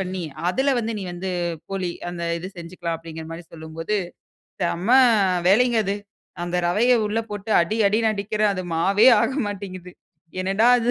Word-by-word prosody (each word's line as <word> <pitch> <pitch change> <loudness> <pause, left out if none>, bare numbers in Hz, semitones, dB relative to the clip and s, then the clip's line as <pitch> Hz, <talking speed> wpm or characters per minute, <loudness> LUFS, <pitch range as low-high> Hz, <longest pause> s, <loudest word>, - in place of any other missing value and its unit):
பண்ணி. 185 -1 -3 0.3
அதில 265 +8 +1
வந்து 225 0 -2
நீ - - -5
வந்து 185 +2 -4 0.4
போளி 190 -2 -2 0.2
அந்த 175 -1 -6 0.2
இது 180 +2 -6
செஞ்சுக்கலாம் 170 -1 -5
அப்டின்கற 160 -1 -9
மாரி 170 +1 -8
சொல்லும்போது, 165 +5 -4 0.7
செம்ம 175 +4 -1 0.6
வேலைங்க 235 +3 +4
அது. 200 +1 0 0.5
அந்த 175 +1 -2
ரவைய 235 +8 +3
உள்ள 215 +2 0
போட்டு 205 +1 -6
அடி, 215 +7 -2
அடின்னு 220 +2 +2
அடிக்கிற 210 +1 -3
அது 185 -1 -4
மாவே 200 +8 +4 0.2
ஆக 265 - 0
மாட்டேன்கிது. 185 -3 -7 0.5
என்னடா 195 +5 +3
இது 235 +1 +1
190 Hz, 155 wpm, -23 LUFS, 175-215 Hz, 0.7 s, வேலைங்க